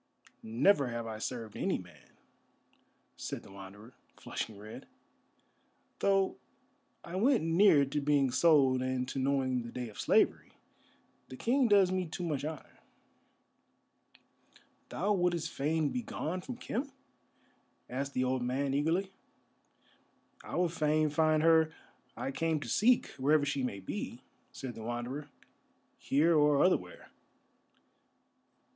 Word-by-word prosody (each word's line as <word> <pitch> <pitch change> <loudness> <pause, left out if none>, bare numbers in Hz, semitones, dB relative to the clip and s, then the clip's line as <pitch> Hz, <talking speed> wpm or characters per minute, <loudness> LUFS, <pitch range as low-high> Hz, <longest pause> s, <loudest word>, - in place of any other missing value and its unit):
"Never 135 - +3
have 120 -1 -4
I 110 -1 -6
served 115 -2 -5
any - - 0
man," - - -15 1.0
said - - -6
the - - -14
Wanderer, 100 +4 -12 0.3
flushing 110 -3 -5
red, 105 +2 -10 1.1
"though 195 -1 +2 0.7
I 170 - -8
went 245 - +3
near 165 -3 +5
to 145 +2 -2
being 140 -2 +2
sold 135 -2 +4
and 130 0 -1
to 135 - -3
knowing 130 -2 0
the 115 0 -8
day 125 -2 -5
of 105 - -13
slavery. - - +2 0.8
The 130 - -8
King 255 - +2
does 200 -4 +5
me 185 -1 -1
too 160 +3 -6
much 150 -5 -2
honour." 155 -1 -7 2.1
"Thou 205 +3 0
wouldest 175 -3 0
fain 155 +2 0
begone 185 -8 -4
from 245 +6 -7
Khem?" 260 +2 -4 1.0
asked 135 +2 -4
the 130 - +1
old 130 0 0
man, 135 +3 -1
eagerly. 165 +7 0 1.3
"I - - -7
would 175 -2 +1
fain 155 -1 +1
find 155 0 +2
her 160 -1 +5 0.5
I 135 - -3
came 160 +2 0
to - - -6
seek, 240 +3 +3
wherever 145 +2 +3
she 140 -1 -1
may 125 -6 -3
be," 95 - -6 0.3
said 130 -2 -7
the 115 - -10
Wanderer. 120 +6 -5 0.7
"Here 160 +5 +2
or 150 -2 +4
otherwhere." 90 - -1
145 Hz, 130 wpm, -31 LUFS, 130-170 Hz, 2.1 s, near